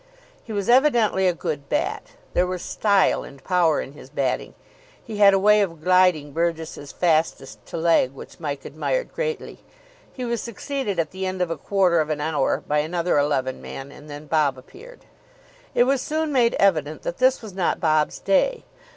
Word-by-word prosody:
He - - -10
was 205 -1 -2
evidently 240 -7 +4
a - - +4
good 145 -4 -5
bat. - - -2 0.2
There 180 - +2
was 180 -1 -4
style 200 -3 +2
and 140 -1 -13
power 175 -4 +2
in - - -8
his 140 -3 -13
batting. 135 -3 -2 0.5
He 220 -2 -7
had 200 -1 +7
a 195 - +3
way 210 +2 +5
of 165 -6 -3
gliding 180 -5 +3
Burgess's 160 -3 -3
fastest 160 -5 0
to - - -6
leg 165 -5 +3
which 135 - -12
Mike 145 -4 -5
admired - - -2
greatly. 480 -2 -4 0.5
He 255 - -6
was 235 -1 -2
succeeded 235 -3 -4
at 165 -2 -1
the 190 0 -4
end 185 0 -4
of 180 -2 0
a - - -1
quarter 185 0 +2
of 155 - -3
an 150 -1 -1
hour 150 -2 0
by 150 0 +2
another 170 +1 0
eleven 135 -3 -1
man, 135 +1 -8
and 150 +1 -14
then 145 +1 -8
Bob 150 -3 +1
appeared. 460 - -14 0.7
It - - +5
was 265 +1 +1
soon 310 +2 -2
made 240 -4 +3
evident 155 -6 +1
that 170 - -4
this 255 -1 +3
was 210 -4 -8
not 185 -2 0
Bob's 155 -2 +1
day. 485 - +1
175 Hz, 185 wpm, -23 LUFS, 150-210 Hz, 0.7 s, had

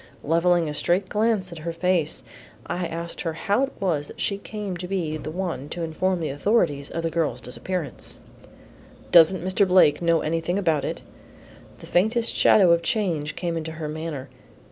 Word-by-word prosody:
Levelling 170 +2 +2
a 150 - -3
straight 185 +5 0
glance 210 -4 +1
at 170 - -8
her 170 +2 -4
face, 170 -2 0 0.4
I 175 -1 -2
asked 170 +1 -5
her 165 -2 -2
how 200 +9 0
it 275 - -13
was 160 -7 0
that - - -11
she 200 -1 -1
came 205 -2 -5
to 180 +1 -6
be 175 -5 -2
the 155 - -6
one 165 -5 -4
to 170 - -4
inform 175 +3 -1
the 155 - -1
authorities 145 -2 +1
of 165 - -4
the 165 - -1
girl's 155 -7 -1
disappearance. 150 +6 -4 0.9
"Doesn't 175 +1 +6
Mr. 190 +1 +2
Blake 180 -5 +5
know 170 -1 +3
anything 165 +3 -1
about 165 -7 +1
it?" - - -4 0.7
The - - -12
faintest 225 +6 +1
shadow 190 -5 +6
of 170 - +5
a - - -17
change 165 -6 -1
came 170 -2 -2
into 160 0 -4
her 155 -1 -5
manner. 155 -3 -5
170 Hz, 185 wpm, -24 LUFS, 160-185 Hz, 0.9 s, Doesn't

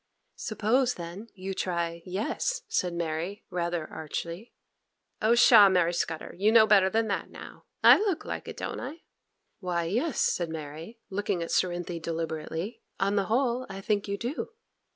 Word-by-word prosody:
'Suppose 240 +4 +1
then 175 +6 -7
you 190 0 -5
try 170 -2 -2
"yes,"' 225 - -2
said 180 - 0
Mary, 170 +3 -3
rather 170 -2 -1
archly. 170 +6 -6 0.7
'Oh, 225 +2 +4
pshaw, 225 -4 +8
Mary 175 -2 +2
Scudder! 165 -2 -3
You 205 +4 +3
know 225 -1 +7
better 200 -3 +5
than 225 +3 +1
that 200 - -2
now. - - -12 0.2
I - - +9
look 400 -5 -1
like - - -5
it, - - -7
don't - - -4
I?' 305 +6 -7 0.6
'Why, 180 -3 -1
yes,' 235 - -1
said 175 -2 +1
Mary, 160 +7 -7
looking 195 -3 -1
at 165 - -6
Cerinthy 175 -1 0
deliberately, 165 +6 -4 0.2
'on 200 +1 +1
the 200 -1 +2
whole 245 +2 0
I 195 0 -6
think 205 0 -1
you 200 0 -2
do. 245 +8 -3
190 Hz, 160 wpm, -28 LUFS, 170-220 Hz, 0.7 s, I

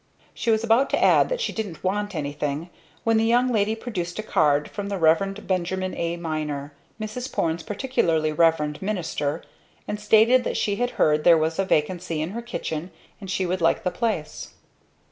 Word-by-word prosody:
She 235 - -3
was 220 0 +3
about 230 +4 +3
to - - +1
add - - +5
that - - -1
she 475 - -2
didn't 205 -7 -5
want 205 +1 -1
anything, 145 +2 -3 0.3
when 225 -1 +3
the 220 - +3
young 240 +3 +3
lady 215 -2 +1
produced 185 -7 -5
a 215 - -3
card 150 -7 +2
from 200 -1 -5
the 200 - -2
Rev. 190 +5 +2
Benjamin 185 0 -1
A. 170 0 -2
Miner, 150 -3 -4 0.3
Mrs. 220 +4 -5
Porne's 165 0 -1
particularly 175 - 0
revered 150 -2 +2
minister, 165 -6 -2 0.4
and 210 - -3
stated 220 +4 +5
that - - -2
she 205 -1 0
had 245 0 0
heard 150 0 +3
there 170 -1 +7
was 160 +2 -1
a 195 - +2
vacancy 170 0 0
in 155 +3 -2
her 235 +3 -5
kitchen 175 -8 -4 0.3
and 195 -3 -9
she 190 0 0
would 180 0 -2
like 165 +6 +2
the 180 - 0
place. 210 -11 -3
185 Hz, 185 wpm, -24 LUFS, 160-220 Hz, 0.4 s, there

